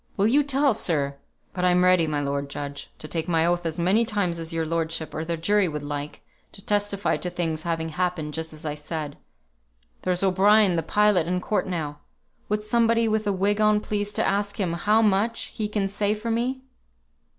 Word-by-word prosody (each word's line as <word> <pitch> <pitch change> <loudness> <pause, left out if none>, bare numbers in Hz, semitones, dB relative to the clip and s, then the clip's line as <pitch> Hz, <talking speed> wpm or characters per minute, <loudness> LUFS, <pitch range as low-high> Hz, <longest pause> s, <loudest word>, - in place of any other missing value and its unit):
Will 200 - +3
you 265 +7 +4
tell, 280 -1 +2
sir? 140 -8 0 0.4
But 180 - -3
I'm 180 0 +4
ready, 180 -3 +4
my 150 -1 -1
lord 140 0 -2
judge, 140 0 -6
to 155 - -7
take 160 0 -2
my 165 -2 +2
oath 175 0 +1
as 160 +1 -4
many 190 +7 +3
times 200 -6 -1
as 165 0 -5
your 165 -1 -1
lordship 165 0 -2
or 155 - -3
the 165 0 -2
jury 200 +4 +2
would 150 -2 -4
like, 145 0 -5 0.3
to 195 - -10
testify 205 -1 0
to 180 - -4
things 165 -3 -2
having 165 -1 -2
happened 160 -2 -2
just 160 +1 -4
as 155 0 -11
I 150 - -1
said. 150 0 -5 0.9
There's 180 0 0
O'Brien, 195 +1 +5
the 165 - +1
pilot, 205 0 +2
in 180 +1 0
court 205 +3 -1
now. 155 -5 -3 0.5
Would 210 0 0
somebody 230 +1 +2
with 215 -1 0
a - - +3
wig 200 +2 +1
on 215 0 +4
please 205 -1 -2
to - - 0
ask 200 +1 -1
him 180 -4 0
how 210 +6 +3
much 215 +3 +1
he 215 - -2
can 210 -2 -1
say 205 +1 0
for 225 +2 -4
me?" 255 +3 -1
180 Hz, 205 wpm, -25 LUFS, 160-210 Hz, 0.9 s, O'Brien